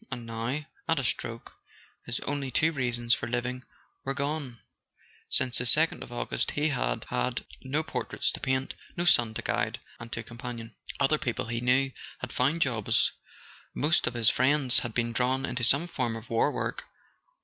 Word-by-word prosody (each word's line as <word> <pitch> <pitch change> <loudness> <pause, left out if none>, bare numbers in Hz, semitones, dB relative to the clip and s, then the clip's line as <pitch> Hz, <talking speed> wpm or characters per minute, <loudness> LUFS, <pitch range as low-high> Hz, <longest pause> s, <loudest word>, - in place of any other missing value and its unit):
And 120 -2 -5
now, 115 +6 -3 0.2
at - - +3
a - - 0
stroke, - - -2 0.5
his 120 -1 -2
only 140 -2 -2
two 155 +6 +3
reasons 120 -4 +1
for 120 - 0
living 125 +1 -2 0.4
were 135 0 -2
gone: 140 -3 -2 0.7
since 125 -2 +3
the 125 - -1
second 160 +7 +5
of - - -8
August 120 - -1
he 150 +2 +1
had - - -1
had - - -1 0.2
no 145 +4 -1
portraits - - -1
to - - -4
paint, 130 0 -1 0.2
no 175 - 0
son 120 -9 +4
to - - -3
guide - - -1 0.2
and 120 -1 -9
to 115 - -3
com¬ 120 +1 -12
panion. 115 -2 -6 0.3
Other 145 +2 +3
people, 120 -2 -2
he 115 0 -1
knew, 130 +2 +3 0.3
had 130 - -6
found 145 +6 +2
jobs: 115 -6 +2 0.6
most 155 +4 +2
of 125 - -2
his 115 -2 +5
friends 130 0 +4
had 120 -2 -5
been 115 -1 0
drawn 130 +3 +1
into 125 -1 -3
some 140 +8 +5
form 125 -8 -2
of 115 +1 -9
war 115 +5 +3
work. - - -3
125 Hz, 180 wpm, -29 LUFS, 120-140 Hz, 0.7 s, second